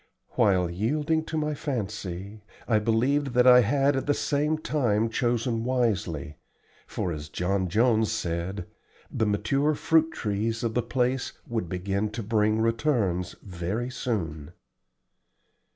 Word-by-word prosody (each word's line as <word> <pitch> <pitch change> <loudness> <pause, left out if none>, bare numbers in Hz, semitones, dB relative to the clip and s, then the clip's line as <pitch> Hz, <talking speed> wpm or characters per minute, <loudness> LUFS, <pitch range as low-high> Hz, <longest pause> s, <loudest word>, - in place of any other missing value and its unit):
While 90 -3 +2
yielding 150 - 0
to 160 - -3
my 150 0 0
fancy, 105 - -4 0.3
I 110 -3 +3
believed 125 +5 +1
that 125 0 +5
I 125 -1 +9
had 140 +4 +2
at 135 - -2
the 145 - +3
same 150 +2 0
time 115 -8 0
chosen 120 -1 0
wisely, 95 - -1 0.5
for, 90 - -3
as 75 -2 -6
John 95 +3 -1
Jones 110 +2 +3
said, 90 -2 -3 0.5
the 110 - 0
mature 135 +9 +1
fruit 160 +1 +3
trees 110 +1 -2
of 115 -1 -1
the 125 - +1
place 125 +2 -1
would 110 -8 -3
begin 95 +4 -1
to 115 0 -4
bring 110 0 +2
returns 115 - 0
very 100 +7 -3
soon. 85 - -3
110 Hz, 135 wpm, -27 LUFS, 95-130 Hz, 0.5 s, I